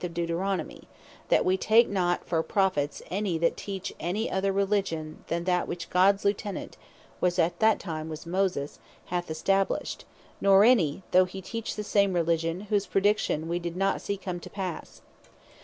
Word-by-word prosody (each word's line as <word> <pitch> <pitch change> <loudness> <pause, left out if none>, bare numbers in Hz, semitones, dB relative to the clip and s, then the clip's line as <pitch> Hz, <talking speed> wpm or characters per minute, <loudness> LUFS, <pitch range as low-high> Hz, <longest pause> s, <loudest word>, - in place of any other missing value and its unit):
of 170 -1 -4
Deuteronomy; 175 +3 -2 0.4
That - - +3
wee 185 +1 +3
take 225 +4 +5
not 180 -3 0
any - - -24
for 165 -2 +1
Prophets, 175 -7 0
that 180 -4 +1
teach 195 -2 -5
any 200 +6 -2
other 195 +1 +1
Religion, 195 -6 -1
then 170 0 -1
that 180 0 +1
which 170 -1 -6
Gods 195 +2 +4
Lieutenant, 200 0 -2 0.4
(which 180 0 +1
at 175 0 +1
that 220 -1 +4
time 160 -3 -5
was 155 +1 -7
Moses,) 180 -5 -1 0.3
hath 175 -1 -2
established; 195 +5 0 0.4
nor 195 0 +6
any, 195 - +3
(though 185 +1 +6
he 185 +1 -8
teach 225 +4 -5
the 210 - -4
same 200 -2 +2
Religion,) 165 0 0
whose 205 -1 -1
Praediction 195 -5 +1
we 170 +1 -1
doe 170 -1 -4
not 195 +1 0
see 200 - -3
come 185 -2 -5
to - - -10
passe. 185 -4 -6
185 Hz, 170 wpm, -27 LUFS, 170-200 Hz, 0.4 s, nor